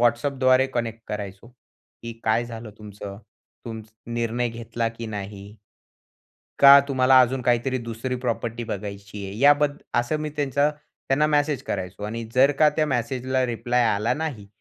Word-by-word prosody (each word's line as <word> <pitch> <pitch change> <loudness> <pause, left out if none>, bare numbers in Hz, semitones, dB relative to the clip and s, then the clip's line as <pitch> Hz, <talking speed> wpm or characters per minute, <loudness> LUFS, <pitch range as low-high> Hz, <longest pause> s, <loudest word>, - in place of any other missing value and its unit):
WhatsAppद्वारे 130 +2 +3
connect 115 -1 -2
करायचो, 100 +1 -6
की 115 -1 -14
काय 110 +2 +2
झालं 115 -2 -8
तुमचं? 100 -1 -9 0.5
तुमचं 110 0 -9
निर्णय 120 +1 -1
घेतला 115 0 -3
की 115 - -5
नाही? 100 -1 -7 1.0
का 140 0 +10
तुम्हाला 130 -1 +5
अजून 125 +1 +1
काहीतरी 125 +2 +1
दुसरी 115 +2 -4
प्रॉपर्टी 115 0 -2
बघायची 100 -1 -6
आहे? 95 +2 -7
याबद्दल 145 +2 +4 0.2
असं 120 +6 -2
मी, 155 0 -3
त्यांचा 145 0 +1 0.4
त्यांना 145 +3 +3
मेसेज 145 -2 +1
करायचो 90 -3 -5
आणि 115 +2 -4
जर 135 +2 +6
का, 155 -1 +6
त्या 155 0 0
मेसेजला 130 0 -1
रिप्लाय 120 +1 0
आला 105 +3 0
नाही. 145 -10 -4
120 Hz, 145 wpm, -24 LUFS, 110-130 Hz, 1.0 s, का